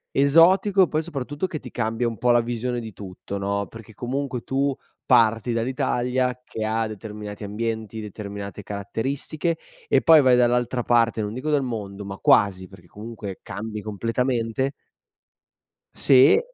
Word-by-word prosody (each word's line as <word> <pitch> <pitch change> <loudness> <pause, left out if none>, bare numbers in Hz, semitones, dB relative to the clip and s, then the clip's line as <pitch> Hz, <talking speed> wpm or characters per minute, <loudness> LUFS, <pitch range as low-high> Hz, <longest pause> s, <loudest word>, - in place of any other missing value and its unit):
Esotico 180 +8 +5
e 180 - +4
poi 155 +1 0
soprattutto 145 +1 -4
che 155 - -5
ti - - -10
cambia 115 0 -1
un 115 - -5
po' 120 +2 +1
la 120 - +5
visione 120 +1 -2
di 110 -2 -8
tutto, 95 0 -8
no. 100 +1 -1
Perché 115 +1 -12
comunque 130 +2 -3
tu 135 +1 0 0.3
parti 115 -1 +3
dall'Italia 125 +1 0
che 110 - -5
ha 110 +1 0
determinati 105 -1 -7
ambienti, 110 +1 -4
determinate 100 -1 -7
caratteristiche 135 - -3 0.3
e - - +3
poi 160 -2 +7
vai 130 -2 +5
dall'altra 125 0 +2
parte, 115 -2 +2
non 105 +1 -4
dico 135 +5 -3
del 145 -2 +2
mondo, 105 -5 -5
ma 95 0 -6
quasi, 95 -2 +3
perché 90 -3 -16
comunque 105 0 -8
cambi 105 +1 -6
completamente. 115 +4 -1 1.2
Sì. 135 +1 +6
115 Hz, 150 wpm, -24 LUFS, 105-130 Hz, 1.2 s, poi